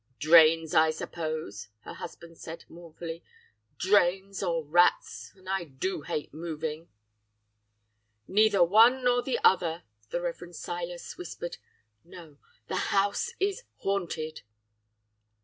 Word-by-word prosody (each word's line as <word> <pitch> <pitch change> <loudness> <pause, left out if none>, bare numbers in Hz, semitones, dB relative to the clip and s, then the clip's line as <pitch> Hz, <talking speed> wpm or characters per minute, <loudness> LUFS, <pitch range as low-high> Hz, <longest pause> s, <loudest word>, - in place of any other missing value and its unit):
"'Drains, 160 0 +6
I 160 0 +5
suppose!' 155 - -5
her - - -9
husband 165 0 -10
said 165 +1 -9
mournfully, 165 0 -9 0.6
'drains 195 0 +2
or 165 -4 -1
rats! 175 +4 +2
and 185 -1 -19
I 190 -1 -1
do 155 +5 -4
hate 155 -3 -4
moving.' 160 0 -5 1.4
"'Neither 205 -1 +4
one 230 +8 +5
nor 245 0 +3
the 255 0 -1
other!' 170 -2 +3 0.3
the 175 - -2
Rev. 175 0 -5
Silas 175 +1 -6
whispered. 175 0 -6 0.5
'No! 165 -4 -13 0.3
the 185 - -2
house 205 - +1
is 395 +4 0 0.2
haunted. 170 -5 -2
175 Hz, 115 wpm, -28 LUFS, 160-195 Hz, 1.4 s, Drains